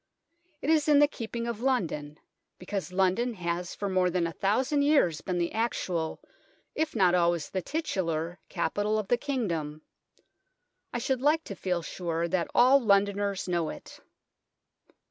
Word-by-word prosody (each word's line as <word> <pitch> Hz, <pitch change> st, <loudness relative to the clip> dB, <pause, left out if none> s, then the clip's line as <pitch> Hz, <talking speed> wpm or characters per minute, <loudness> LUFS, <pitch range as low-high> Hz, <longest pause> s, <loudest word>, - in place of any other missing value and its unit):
It 300 Hz, -, +2 dB
is 310 Hz, -2 st, +3 dB
in 295 Hz, -1 st, +6 dB
the 290 Hz, 0 st, +6 dB
keeping 235 Hz, -4 st, -5 dB
of 235 Hz, -2 st, -4 dB
London, 165 Hz, -, -1 dB, 0.4 s
because 185 Hz, -2 st, -4 dB
London 195 Hz, +6 st, +1 dB
has 175 Hz, -1 st, -3 dB
for 200 Hz, -, -3 dB
more 185 Hz, -1 st, +2 dB
than 175 Hz, -1 st, 0 dB
a 165 Hz, -, -2 dB
thousand 255 Hz, -, +1 dB
years 280 Hz, -, +3 dB
been 180 Hz, -1 st, -2 dB
the 170 Hz, -1 st, 0 dB
actual, 185 Hz, -8 st, -2 dB, 0.5 s
if 315 Hz, -3 st, -2 dB
not 185 Hz, -5 st, +4 dB
always 170 Hz, -3 st, +1 dB
the 190 Hz, -, -1 dB
titular, 175 Hz, -, -2 dB
capital 205 Hz, +5 st, 0 dB
of 210 Hz, -2 st, -3 dB
the 245 Hz, -, +4 dB
kingdom. 170 Hz, -, -3 dB, 1.1 s
I -, -, -2 dB
should 255 Hz, +1 st, -1 dB
like 305 Hz, +3 st, +3 dB
to 200 Hz, -, -7 dB
feel 180 Hz, -2 st, -2 dB
sure 170 Hz, -1 st, -2 dB
that 170 Hz, 0 st, -1 dB
all 260 Hz, +3 st, +6 dB
Londoners 200 Hz, -2 st, +1 dB
know 170 Hz, -3 st, 0 dB
it. -, -, -10 dB
195 Hz, 155 wpm, -28 LUFS, 170-245 Hz, 1.1 s, in